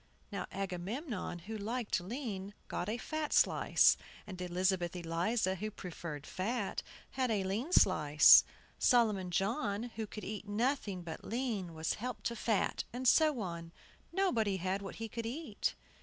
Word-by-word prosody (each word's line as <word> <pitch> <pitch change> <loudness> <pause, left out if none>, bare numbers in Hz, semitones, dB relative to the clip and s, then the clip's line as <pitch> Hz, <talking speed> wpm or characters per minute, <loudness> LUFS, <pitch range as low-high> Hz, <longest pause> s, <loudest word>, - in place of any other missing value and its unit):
Now 200 -2 -4
Agamemnon, 195 - -4
who 220 +1 -5
liked 220 +1 -1
lean, 205 -1 -5
got 180 - -3
a 225 - -1
fat 310 +4 -3
slice; - - +5 0.3
and 185 -3 -8
Elizabeth 180 0 0
Eliza, 180 +4 0
who 210 +3 -4
preferred 170 -7 -7
fat, 205 +2 -2 0.3
had 260 -2 0
a 210 -3 +1
lean 215 - -2
slice. 155 - +7 0.4
Solomon 215 -7 +3
John, 205 - -1
who 220 -1 -3
could 215 - -8
eat 210 -1 -6
nothing 210 -4 0
but 165 -1 -7
lean, 220 -8 -3
was 160 0 -1
helped 250 +1 -4
to 235 - -1
fat, 220 -3 0
and 255 +2 -2
so 305 -2 +5
on. 170 -3 -5 0.4
Nobody 235 - +1
had 190 +2 -1
what 195 - -7
he 225 - -5
could 230 +1 -4
eat. 260 -3 -2
205 Hz, 150 wpm, -34 LUFS, 185-235 Hz, 0.4 s, slice